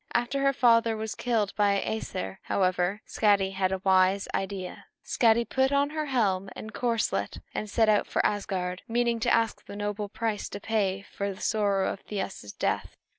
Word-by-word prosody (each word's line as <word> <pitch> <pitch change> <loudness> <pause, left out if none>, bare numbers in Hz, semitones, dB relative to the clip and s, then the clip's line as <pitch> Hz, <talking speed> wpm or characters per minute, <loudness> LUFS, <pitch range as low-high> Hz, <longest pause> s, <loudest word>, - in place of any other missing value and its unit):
After 240 +3 +1
her 275 0 +4
father 230 -3 +4
was 220 0 -3
killed 225 -5 -1
by 205 -1 +3
the 200 - 0
Æsir, 95 - -4
however, 185 +1 0
Skadi 200 -3 +2
had 190 -1 0
a 190 -1 -2
wise 190 +1 +3
idea. 190 -1 -4 0.2
Skadi 235 -2 +3
put 265 +1 +2
on 280 +1 +2
her 310 -1 -2
helm 200 -8 +1
and 215 0 -8
corselet 235 -2 -1
and 210 - -3
set 225 +2 +3
out 210 -1 +3
for - - 0
Asgard, 185 -3 -1
meaning 235 0 +1
to - - +1
ask 225 -1 +2
a - - -6
noble 205 0 -3
price 220 -1 -2
to - - -6
pay 200 -3 0
for 200 0 -4
the 190 - -10
sorrow 200 -3 +1
of - - -10
Thiasse's 195 - -5
death. - - -2
205 Hz, 180 wpm, -28 LUFS, 195-230 Hz, 0.2 s, her